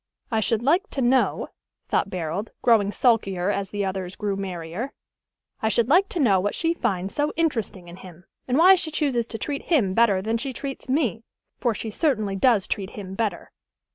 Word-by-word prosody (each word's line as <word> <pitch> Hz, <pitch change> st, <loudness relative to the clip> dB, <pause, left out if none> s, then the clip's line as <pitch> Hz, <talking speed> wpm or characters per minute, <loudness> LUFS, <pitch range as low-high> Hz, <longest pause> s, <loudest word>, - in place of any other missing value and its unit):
"I 220 Hz, -, +2 dB
should 225 Hz, +1 st, 0 dB
like 345 Hz, -, +2 dB
to 270 Hz, -, -3 dB
know," 255 Hz, +2 st, +2 dB, 0.4 s
thought 200 Hz, -, +1 dB
Barold, 180 Hz, +4 st, -3 dB
growing 215 Hz, -4 st, +4 dB
sulkier 200 Hz, -6 st, +1 dB
as 200 Hz, -2 st, -2 dB
the 205 Hz, 0 st, -2 dB
others 190 Hz, -1 st, -4 dB
grew 205 Hz, -2 st, -2 dB
merrier, 185 Hz, +5 st, -5 dB, 0.7 s
"I 220 Hz, -, +1 dB
should 235 Hz, +1 st, +1 dB
like 375 Hz, +7 st, +4 dB
to 385 Hz, -7 st, -3 dB
know 205 Hz, -10 st, +4 dB
what 205 Hz, +3 st, -1 dB
she 330 Hz, 0 st, +1 dB
finds 195 Hz, -, -2 dB
so 295 Hz, +1 st, 0 dB
interesting 225 Hz, -, -1 dB
in 175 Hz, +1 st, -10 dB
him, 180 Hz, -2 st, -13 dB, 0.2 s
and 255 Hz, +1 st, +1 dB
why 360 Hz, +4 st, +8 dB
she 340 Hz, -4 st, 0 dB
chooses 275 Hz, -7 st, 0 dB
to 225 Hz, -, -5 dB
treat 280 Hz, +6 st, -4 dB
him 235 Hz, -, +2 dB
better 215 Hz, -3 st, +4 dB
than 220 Hz, +4 st, -1 dB
she 265 Hz, +3 st, -4 dB
treats 270 Hz, +1 st, -6 dB
me; 250 Hz, -, 0 dB, 0.4 s
for 240 Hz, -3 st, 0 dB
she 220 Hz, +1 st, -5 dB
certainly 215 Hz, -, 0 dB
does 215 Hz, -1 st, +3 dB
treat 195 Hz, -3 st, -3 dB
him 190 Hz, -2 st, -7 dB
better." 200 Hz, -3 st, -3 dB
220 Hz, 195 wpm, -24 LUFS, 195-270 Hz, 0.7 s, why